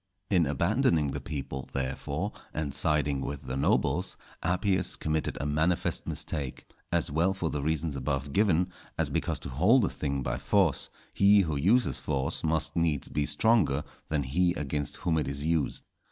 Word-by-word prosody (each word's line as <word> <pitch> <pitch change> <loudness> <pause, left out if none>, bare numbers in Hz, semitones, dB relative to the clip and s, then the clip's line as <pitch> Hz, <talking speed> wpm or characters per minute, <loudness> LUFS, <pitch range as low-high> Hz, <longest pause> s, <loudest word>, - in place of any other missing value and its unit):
In 90 -6 +4
abandoning 85 - +2
the - - -4
people, 65 -3 -5
therefore, 70 +8 -2 0.2
and 75 -3 -2
siding 75 -3 +1
with 70 +1 -4
the 65 0 -4
nobles, 70 - +1 0.2
Appius 95 +1 +1
committed 80 0 -2
a - - -2
manifest 80 +4 0
mistake, 70 -5 -4 0.3
as 85 -4 +1
well 85 +6 +2
for 85 -4 -2
the 75 - -2
reasons 80 0 -1
above 70 +1 -2
given, 90 -2 +3 0.3
as - - 0
because - - -1
to - - -6
hold 100 - +4
a - - 0
thing 70 -2 -2
by 60 +1 -2
force, 95 -6 +2 0.2
he 100 +1 +6
who 80 -5 -1
uses 90 - +2
force 70 -1 -2
must 80 0 0
needs 80 -4 0
be 75 -1 -1
stronger 100 -11 +3 0.3
than 75 -2 +1
he 85 +7 +1
against 75 0 -2
whom 80 -2 0
it 75 - -2
is 70 +2 -2
used. 80 -1 0
75 Hz, 170 wpm, -29 LUFS, 70-90 Hz, 0.3 s, he